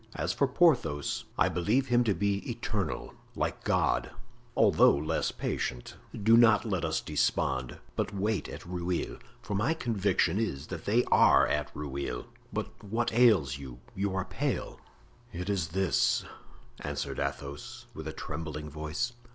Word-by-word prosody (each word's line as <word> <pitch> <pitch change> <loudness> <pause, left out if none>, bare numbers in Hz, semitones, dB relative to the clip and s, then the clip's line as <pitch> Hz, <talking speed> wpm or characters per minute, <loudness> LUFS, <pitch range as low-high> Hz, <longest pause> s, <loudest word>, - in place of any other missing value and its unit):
As - - -1
for 140 - +2
Porthos, 125 - +2
I - - +4
believe 115 +10 +1
him 120 0 +4
to 105 -4 +2
be 100 +2 +1
eternal, 115 -4 -3 0.2
like - - -2
God, - - +1 0.5
although 100 -8 +6
less 75 +2 -1
patient. 60 -1 -3 0.3
Do 115 +2 +7
not 115 -2 +6
let 95 -6 -1
us 80 -1 0
despond, 65 -4 0 0.2
but - - -1
wait 100 -3 -1
at - - -8
Rueil, 90 0 -3 0.2
for - - -4
my 120 +11 +1
conviction 105 - +1
is 75 -11 -2
that 95 -4 -6
they 115 +4 +3
are - - +6
at 75 -2 -1
Rueil. 70 -4 -4 0.3
But - - -5
what 115 +4 -1
ails 100 - +4
you? 65 -3 -9 0.2
You 100 0 -1
are 95 -1 -1
pale." - - -3 0.5
"It 90 +4 -3
is 95 -5 0
this," 95 +2 +1 0.5
answered - - -4
Athos, 120 +13 -5
with 80 0 -7
a - - -3
trembling 75 -2 -5
voice. 80 - -3
95 Hz, 150 wpm, -30 LUFS, 75-115 Hz, 0.5 s, Do